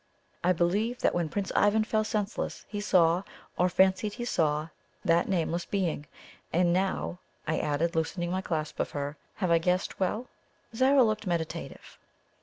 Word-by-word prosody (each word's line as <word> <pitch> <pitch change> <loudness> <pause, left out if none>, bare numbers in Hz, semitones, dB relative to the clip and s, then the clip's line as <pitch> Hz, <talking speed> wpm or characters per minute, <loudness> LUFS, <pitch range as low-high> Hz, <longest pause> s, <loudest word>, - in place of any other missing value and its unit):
I 180 - +4
believe 200 +8 +1
that - - +3
when 170 -3 0
Prince 200 +2 -2
Ivan 205 +2 +4
fell 215 0 +1
senseless, 215 0 -3
he 205 -1 -4
saw, 175 -3 +4 0.3
or 180 +1 +2
fancied 190 +3 +2
he 240 - -4
saw, 155 -7 +1 0.4
that 170 0 +3
nameless 170 -2 0
being. 175 -7 -1 0.4
And 175 0 +3
now," 185 -1 -1 0.3
I 160 0 +1
added, 155 +3 0
loosening 175 +2 -1
my 185 +1 0
clasp 155 -4 -3
of - - 0
her, 145 0 -4 0.2
"have 185 -4 0
I 165 - +5
guessed 180 +2 0
well?" 210 +6 -1 0.5
Zara 265 +2 +5
looked 215 -2 0
meditative. 165 -1 -4
180 Hz, 160 wpm, -29 LUFS, 165-205 Hz, 0.5 s, I